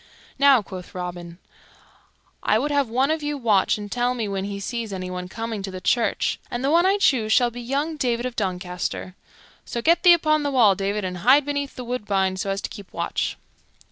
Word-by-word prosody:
"Now," 275 -5 +6
quoth 185 -2 -10
Robin, 175 -1 -6 1.0
"I 215 - +2
would 290 +6 -1
have 280 -4 +1
one 260 +5 +1
of 315 0 -1
you 295 0 -2
watch 215 -8 +2
and 205 -1 -8
tell 245 +1 0
me 225 -3 -2
when 195 -1 -3
he 200 0 -5
sees 230 +2 -4
anyone 185 -1 -5
coming 225 0 -4
to 195 - -5
the 185 -1 -7
church, 235 +5 0
and 240 +1 -4
the 275 - +2
one 340 +3 +4
I 395 +1 +3
choose 245 - +2
shall 245 +1 +4
be 245 +1 -8
young 285 +6 -2
David 240 -3 0
of 250 -1 -4
Doncaster. 180 -2 -3 0.5
So 235 - -4
get 330 +8 +3
thee 355 -2 +8
upon 310 -2 +2
the 290 - -1
wall, 240 -7 +5
David, 195 +1 -2
and 180 -1 -4
hide 265 +8 +5
beneath 285 -1 -3
the 250 - -6
woodbine 205 -6 -1
so 195 - -3
as 195 +1 -2
to - - -4
keep 200 -4 -11
watch." - - -2
230 Hz, 210 wpm, -23 LUFS, 195-275 Hz, 1.0 s, thee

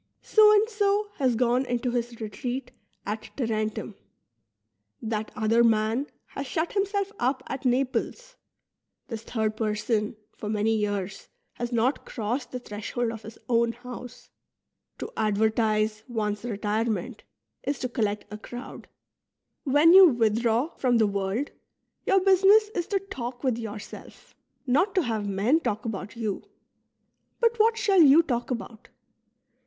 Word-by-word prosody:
So 430 -1 +6
and 425 +1 +4
so 415 -1 +1
"' - - -32
has 255 -4 +2
gone 245 +2 +2
into 245 0 -1
his 240 -1 -3
retreat 245 +4 -4 0.3
at 215 +2 -4
Tarentum; 220 -4 -2 1.1
that 220 -1 -3
other 225 +2 +3
man 225 +4 +2 0.2
has 275 - -6
shut 320 +5 -2
himself 400 0 0
up 255 +2 0
at 270 0 -6
Naples; 275 - -1 0.7
this 225 -3 -5
third 220 -2 -2
person 215 0 -1 0.2
for 210 - -6
many 215 +1 +1
3'ears 205 -2 -3 0.3
has 240 0 -4
not 240 +4 +1
crossed 245 +3 -3
the 255 - -3
threshold 230 +1 -3
of 225 -1 -8
his 220 +1 -11
own 235 -1 +2
house. 250 0 -10 0.7
To - - -6
advertise 215 0 +1
one's 210 -3 -2
retirement 220 0 -2 0.4
is 280 - -2
to 255 - -2
collect 215 -4 -2
a 210 - -7
crowd. 245 +4 -9 0.8
When 295 +5 +6
you 380 0 +10
withdraw 235 +2 +1
from 245 -2 +2
the 220 - +4
world, 200 +6 -2 0.6
your 390 -1 +4
business 390 +3 +5
is 345 -2 -2
to 405 - +1
talk 245 -4 -5
with 250 -4 +1
yourself, 215 -2 -9 0.3
not 320 +10 +2
to 370 - +3
have 220 -4 -2
men 210 +11 +2
talk 215 -9 -3
about 205 -1 -5
you. 220 -4 -3 1.0
But 470 -1 +2
what 450 +1 +4
shall 395 -4 +4
you 305 +2 +7
talk 245 -6 -2
about 235 -3 -6
235 Hz, 140 wpm, -26 LUFS, 215-280 Hz, 1.1 s, you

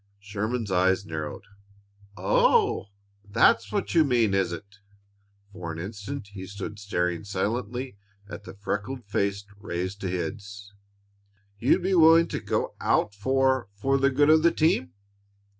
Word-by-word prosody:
Sherman's 105 +2 -3
eyes 95 +2 +2
narrowed. 80 -3 -5 0.7
"Oh, 95 +2 +3 0.4
that's 100 +1 +3
what - - -2
you 165 -2 +6
mean, 120 -7 +2
is 95 -3 +1
it?" 100 +4 -9 0.7
For 85 -3 -6
an 80 - -7
instant 105 +6 -6
he 95 -2 -8
stood 100 +1 -7
staring 90 -4 -1
silently 110 +4 -3 0.3
at 100 - -9
the - - -10
freckled 105 +5 -4
face 100 0 -1
raised 95 +1 -4
to 95 - -2
his. 100 +3 -5 0.9
"You'd 135 +9 +3
be 190 +1 +1
willing 165 -1 +6
to - - -3
get - - 0 0.2
out 105 - +1
for 130 +3 +1
for 135 +7 +1
the 135 0 +4
good 145 +3 +4
of 160 0 +6
the 170 - +5
team?" 90 - +1
100 Hz, 140 wpm, -26 LUFS, 95-125 Hz, 0.9 s, you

